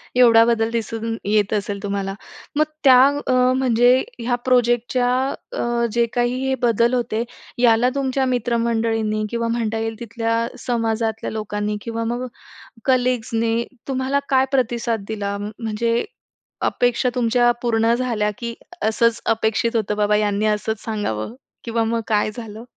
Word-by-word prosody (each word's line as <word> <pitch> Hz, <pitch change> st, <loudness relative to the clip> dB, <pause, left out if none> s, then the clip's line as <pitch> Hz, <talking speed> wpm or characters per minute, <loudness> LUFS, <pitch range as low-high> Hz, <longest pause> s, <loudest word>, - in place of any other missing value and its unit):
एवढा 230 Hz, -2 st, +7 dB
बदल 225 Hz, -1 st, +1 dB
दिसून 225 Hz, 0 st, -3 dB
येत 210 Hz, 0 st, +2 dB
असेल 205 Hz, -1 st, -2 dB
तुम्हाला. 200 Hz, -1 st, -2 dB, 0.4 s
मग 305 Hz, -, +4 dB, 0.2 s
त्या 260 Hz, -3 st, +8 dB, 0.3 s
अ, -, -, +2 dB, 0.3 s
म्हणजे 245 Hz, -1 st, +4 dB, 0.3 s
ह्या 245 Hz, +1 st, 0 dB
प्रोजेक्टच्या 245 Hz, 0 st, +2 dB, 0.4 s
अ, -, -, -4 dB
अ, 235 Hz, 0 st, 0 dB
जे 235 Hz, +2 st, +2 dB
काही 245 Hz, +1 st, 0 dB
हे 265 Hz, -, +1 dB
बदल 235 Hz, 0 st, +3 dB
होते 235 Hz, -2 st, 0 dB, 0.4 s
याला 240 Hz, 0 st, +4 dB
तुमच्या 270 Hz, -1 st, 0 dB
मित्रमंडळींनी 230 Hz, -3 st, 0 dB
किंवा 235 Hz, 0 st, -2 dB
म्हणता 230 Hz, -1 st, -1 dB
येईल 225 Hz, 0 st, -4 dB
तिथल्या 230 Hz, 0 st, -1 dB, 0.2 s
समाजातल्या 225 Hz, -2 st, -1 dB
लोकांनी 210 Hz, -1 st, -3 dB
किंवा 230 Hz, 0 st, -4 dB
मग 245 Hz, +1 st, -3 dB, 0.6 s
कलीग्सनी 235 Hz, -3 st, +1 dB, 0.2 s
तुम्हाला 265 Hz, +1 st, 0 dB
काय 265 Hz, -1 st, +4 dB
प्रतिसाद 235 Hz, -4 st, 0 dB
दिला? 200 Hz, -2 st, -3 dB
म्हणजे 220 Hz, +2 st, -2 dB, 0.7 s
अपेक्षा 245 Hz, +1 st, +1 dB
तुमच्या 240 Hz, 0 st, +3 dB
पूर्ण 230 Hz, -1 st, +2 dB
झाल्या, 235 Hz, -4 st, 0 dB
की 235 Hz, -1 st, -5 dB, 0.3 s
असंच 230 Hz, +1 st, +2 dB
अपेक्षित 225 Hz, +2 st, 0 dB
होतं 210 Hz, -2 st, 0 dB
बाबा 210 Hz, 0 st, +2 dB
यांनी 210 Hz, 0 st, +1 dB
असंच 215 Hz, 0 st, -1 dB
सांगावं 210 Hz, -, -3 dB, 0.3 s
किंवा 230 Hz, -1 st, 0 dB
मग 230 Hz, +1 st, 0 dB
काय 215 Hz, -1 st, +1 dB
झालं? 220 Hz, -1 st, -8 dB
230 Hz, 135 wpm, -21 LUFS, 220-240 Hz, 0.7 s, त्या